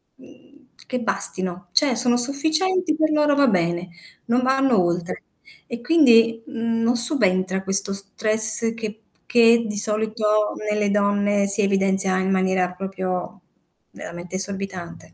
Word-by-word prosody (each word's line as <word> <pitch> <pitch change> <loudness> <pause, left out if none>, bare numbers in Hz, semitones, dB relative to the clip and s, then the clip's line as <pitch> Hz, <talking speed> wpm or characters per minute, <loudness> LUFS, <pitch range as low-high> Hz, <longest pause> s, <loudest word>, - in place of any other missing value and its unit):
mhmm, 285 -2 -21 0.2
che 250 -1 -4
bastino, 185 -4 -1
cioè, 280 -5 +2
sono 245 0 0
sufficienti 315 +6 -1
per 310 0 0
loro 295 -1 +2
va 280 -1 +3
bene, 175 -3 -1 0.4
non 245 +2 0
vanno 265 -4 +2
oltre. 175 +1 -3 0.5
E 235 0 -7
quindi, 230 -6 +3
mhmm, 230 -4 -3
non 240 +2 +1
subentra 190 - 0
questo 195 +1 -1
stress 215 +3 +2
che 220 -1 -7 0.3
che 235 -1 +4
di 210 -1 -5
solito 215 0 -1 0.2
nelle 210 -1 -1
donne 205 0 0
si 200 +2 +7
evidenzia 195 -1 +1
in 190 0 -2
maniera 185 -1 0
proprio 185 +1 -6 0.5
veramente 175 +2 -9
esorbitante. 190 -3 -5
210 Hz, 130 wpm, -21 LUFS, 190-240 Hz, 0.5 s, si